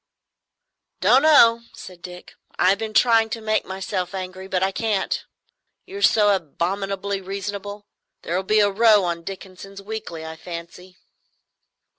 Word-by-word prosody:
"Don't 260 - +5
know, 235 -7 +6
said 180 -2 -12
Dick. 180 0 -11 0.2
"I've 190 +2 +3
been 220 -1 -5
trying 225 -1 +4
to 225 - -4
make 215 -1 -1
myself 190 -1 -4
angry, 185 0 -6
but 190 -1 -1
I 190 - +1
can't, 210 -1 -1 0.6
you're 395 +1 -8
so 210 - +4
abominably 195 +4 -3
reasonable. 200 +1 -6 0.4
There 170 - -3
will 185 - +1
be 210 +3 +2
a 205 -1 +3
row 215 -1 +5
on 170 -1 -2
Dickenson's 195 +2 -9
Weekly, 200 -6 -7
I 160 0 -8
fancy." 175 +2 -10
195 Hz, 140 wpm, -22 LUFS, 185-215 Hz, 0.6 s, know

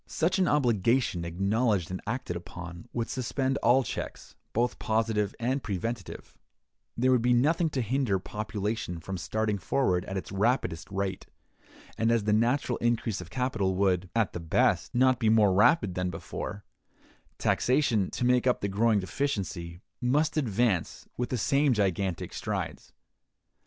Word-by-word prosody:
Such 175 +4 0
an 185 - +3
obligation 120 -7 +2
acknowledged 95 +2 0
and 95 - -4
acted 115 -6 -3
upon, 85 +3 -8
would 115 -1 -2
suspend 130 +1 -1
all 130 +2 +4
checks, - - -6 0.2
both 120 +2 0
positive 110 -2 0
and 130 +4 0
preventive; 105 0 -5 0.6
there 130 +2 +3
would 125 -2 +4
be 125 +1 +3
nothing 160 +7 +3
to 130 -4 -1
hinder 120 -3 +1
population 105 -1 -4
from 95 +3 -5
starting 110 +2 -1
forward 90 -3 +1
at 95 - -4
its 95 - -6
rapidest 100 -5 0
rate; 95 0 -3 0.7
and 115 +1 +3
as 115 -2 +2
the 105 0 +1
natural 120 +3 +1
increase 115 -4 0
of 90 - -10
capital 110 -6 -1
would, 95 -1 +1
at 115 -3 +1
the - - -4
best, 80 +7 +1
not 130 0 +4
be 115 -3 +2
more 105 -3 +5
rapid 105 - +4
than 90 0 -1
before, 100 +2 -6 0.7
taxation, 125 -7 +2
to 125 - -2
make 125 0 +3
up 125 - +2
the 100 - 0
growing 105 +2 +2
deficiency, 95 -5 -3 0.2
must 145 +6 +1
advance 115 - 0
with 125 - -2
the 125 - -1
same 140 +4 +3
gigantic 95 -4 -1
strides. - - -4
110 Hz, 150 wpm, -28 LUFS, 95-125 Hz, 0.7 s, more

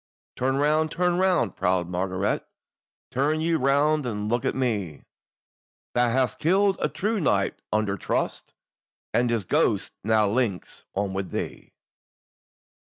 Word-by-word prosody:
"Turn 130 +1 0
round, 155 +2 +2
turn 180 +1 +1
round, 180 - +2
proud 90 -1 +1
Margaret! 95 +2 -1 0.7
Turn 145 +4 +1
ye 165 +1 +1
round, 145 +1 +2
and 105 -2 -3
look 120 +1 0
on - - 0
me, 105 - -2 0.9
Thou 120 0 +3
hast 125 -2 0
killed 195 +4 +3
a - - 0
true 215 +2 -1
knight 100 - +1
under 105 -2 0
trust, - - -3 0.6
And 120 0 +2
his 115 -4 0
ghost - - +1
now 110 0 +3
links 105 -3 -2
on 100 0 -1
with 95 0 -3
thee." - - -5
120 Hz, 135 wpm, -25 LUFS, 100-155 Hz, 0.9 s, Thou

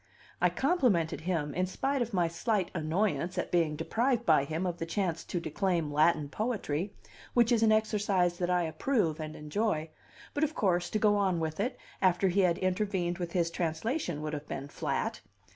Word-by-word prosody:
I - - +5
complimented 200 - +1
him, 160 -4 -1
in 185 +1 0
spite 270 +8 -1
of 240 -1 -1
my 175 -3 +2
slight 195 +2 -1
annoyance 180 +2 0
at - - -2
being 165 -3 +2
deprived 235 - 0
by 155 -4 +4
him 160 +5 -2
of 175 -1 -3
the 165 - -2
chance 165 -2 -1
to 175 - -2
declaim 170 -2 -1
Latin 155 0 +3
poetry, 200 - -2 0.4
which 240 0 +4
is 235 -2 +3
an 220 -1 +5
exercise 205 -5 +2
that 175 -1 0
I 180 -1 +2
approve 165 - 0
and 155 0 -5
enjoy; 155 0 -1 0.4
but 290 - 0
of 310 +1 0
course, 180 -5 +1
to - - 0
go 210 -1 +3
on 190 -4 +1
with 160 +1 -3
it, 245 +5 -1 0.2
after 185 0 +3
he 190 +3 +1
had 175 -2 +3
intervened 185 -2 -1
with 175 -1 -4
his 170 -2 +1
translation, 170 - -2
would 155 0 -3
have 150 0 -5
been 140 +1 -5
flat. - - -2
180 Hz, 190 wpm, -30 LUFS, 160-210 Hz, 0.4 s, I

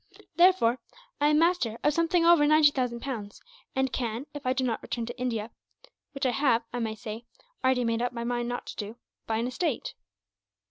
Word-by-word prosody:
"Therefore 345 -9 +4 0.4
I 290 - +3
am 300 0 +4
master 330 -9 +2
of 295 - +3
something 335 +2 +2
over 335 -4 +6
ninety 305 -1 +6
thousand 250 -3 -2
pounds; 220 -7 -6 0.4
and 265 0 0
can, 235 +1 -2
if 290 -3 -6
I - - +3
do 260 0 -1
not 235 -3 -1
return 235 -1 -4
to 240 +2 -8
India 230 -3 -2 0.6
which 275 -1 -3
I 255 - +3
have, 245 -3 +2
I 245 - -2
may 220 -2 -2
say, 220 +2 -7 0.4
already 260 -1 +3
made 230 0 0
up 245 - 0
my 235 -1 -5
mind 240 0 -2
not 245 - -4
to - - -8
do, 210 +1 -6 0.3
buy 220 - 0
an 230 - -1
estate. 255 +2 -2
250 Hz, 200 wpm, -28 LUFS, 230-290 Hz, 0.6 s, over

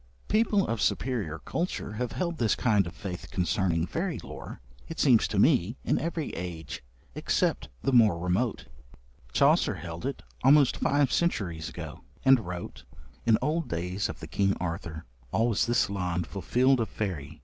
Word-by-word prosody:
People 210 -2 +3
of 115 -2 -2
superior 110 - 0
culture 165 - -3
have 120 +3 -3
held 170 -3 -2
this 115 -4 +2
kind 105 -6 +2
of 85 - -8
faith 90 -3 -6
concerning 90 -2 0
fairy 170 - -2
lore, - - -8 0.3
it 165 - -7
seems 125 -6 +5
to 105 - -3
me, 115 - +3
in - - +1
every 165 -1 -3
age, 80 -6 -6 0.3
except - - 0
the - - +1
more 110 -8 +6
remote. 90 +7 -1 0.7
Chaucer 140 - +3
held 85 - -5
it, 140 - -5 0.2
almost 140 0 +5
five 140 -2 +2
centuries 90 - 0
ago, - - -8 0.2
and 135 -1 +7
wrote: 90 -1 -6 0.4
In 110 -2 +6
olde 160 +3 0
dayes 90 +4 -2
of - - -7
the - - -6
Kyng 100 0 +1
Arthour,... 85 -2 -5 0.3
Al 115 +2 +2
was 110 - +1
this 120 +1 +3
lond 90 -3 -2
fulfilled 125 +10 +2
of 115 - -1
fayrie 90 -10 -4
110 Hz, 160 wpm, -28 LUFS, 90-135 Hz, 0.7 s, and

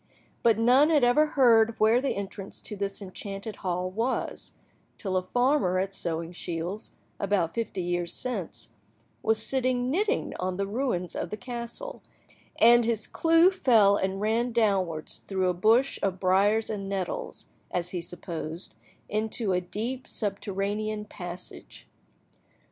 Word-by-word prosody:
But 230 -2 +4
none 250 +6 +5
had 300 -5 +4
ever 245 +6 +5
heard 230 -3 +5
where 220 +3 +4
the 275 - -1
entrance 200 0 -5
to 210 - -5
this 200 0 -3
enchanted 195 +2 -6
hall 180 0 -2
was, 230 +6 -2 0.4
till 190 -2 -3
a 185 - +3
farmer 245 -7 +2
at 195 +1 -1
Sewingshields, 170 +2 -4 0.3
about 195 -5 +1
fifty 225 -5 -3
years 175 -1 -1
since, 225 - -4 0.5
was 220 0 +2
sitting 255 -1 +1
knitting 415 - 0
on 185 0 -2
the 200 - 0
ruins 200 - -2
of 170 - -3
the 210 - -5
castle, 245 - -6 0.6
and 240 +1 +7
his 225 -1 0
clew 330 +2 +4
fell 230 - +5
and 190 0 -1
ran 225 +4 +1
downwards 195 -8 0
through 190 -2 -1
a - - +1
bush 225 +9 +3
of 190 -2 -1
briars 200 +4 +3
and 195 -2 -4
nettles, 190 -3 -4 0.2
as 175 0 -2
he 180 -1 -3
supposed, 170 -1 -6 0.3
into 215 0 -1
a 180 - +1
deep 230 +8 -4
subterranean 205 +1 -2
passage. 180 -3 -8
205 Hz, 140 wpm, -27 LUFS, 185-235 Hz, 0.6 s, and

